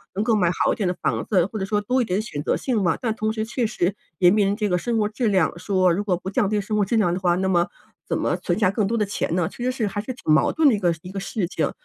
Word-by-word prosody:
能 205 - 0
够 225 -1 +2
买 180 -4 +2 0.2
好 - - +3
一 - - -4
点 200 -4 0
的 180 - -1
房 - - 0
子， 185 -5 +2
或 215 0 -6
者 190 - -2
说 210 +1 0
多 250 +5 +1
一 - - 0
点 185 +1 -1
选 145 -10 -5
择 - - +1
性 240 -6 -1
嘛。 175 -3 +1
但 225 -3 0
同 215 0 -1
时， 220 -1 -2
确 235 0 -1
实 195 -2 -1 0.2
也 180 -1 +6
面 205 -1 +3
临 200 - 0
着 210 -2 -1
个 180 - +2
生 235 +2 -1
活 210 -1 +2
质 230 +1 -1
量 180 -3 +1
说 185 -2 +2
如 200 +4 -1
果 185 -4 0
不 185 - -6
降 200 0 +1
低 210 -1 +1
生 210 +2 -3
活 205 - +3
质 230 - -1
量 175 -5 +2
的 185 - -2
话， 175 -1 +2
那 190 +1 0
么 175 -1 +2 0.4
怎 - - 0
么 - - 0
存 - - -2
下 185 - +4
更 205 -2 0
多 230 +2 -1
的 210 - +1
钱 195 -4 -2
呢？ 175 -3 +1
其 240 - -8
实 255 - +1
是 230 -5 -2
还 205 +1 -3
是 255 +4 -5
挺 155 -11 0
矛 155 - +3
盾 320 -2 +3
的 225 - +3
一 - - -3
个 175 -3 +2
一 180 - -9
个 195 - -3
事 195 -3 -2
情， - - -1
205 Hz, 360 characters per minute, -23 LUFS, 180-220 Hz, 0.4 s, 也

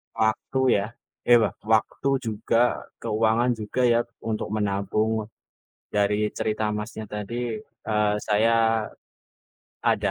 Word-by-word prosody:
waktu 110 +4 0 0.2
ya 100 - -1 0.4
eh, 120 -1 +8
wak - - -1 0.2
waktu 125 +5 +1 0.2
juga 115 +3 +1
keuangan 115 +2 +2
juga, 110 +4 -2
ya 115 - +4 0.2
untuk 110 -1 -2
menabung. 105 +2 0 0.7
Dari 105 +1 +2
cerita 110 0 -1
Masnya 110 +1 -5
tadi, 110 +3 -4 0.3
eh, 105 -1 +2
saya 115 +1 +3 0.9
ada - - +1
110 Hz, 105 wpm, -25 LUFS, 105-115 Hz, 0.9 s, eh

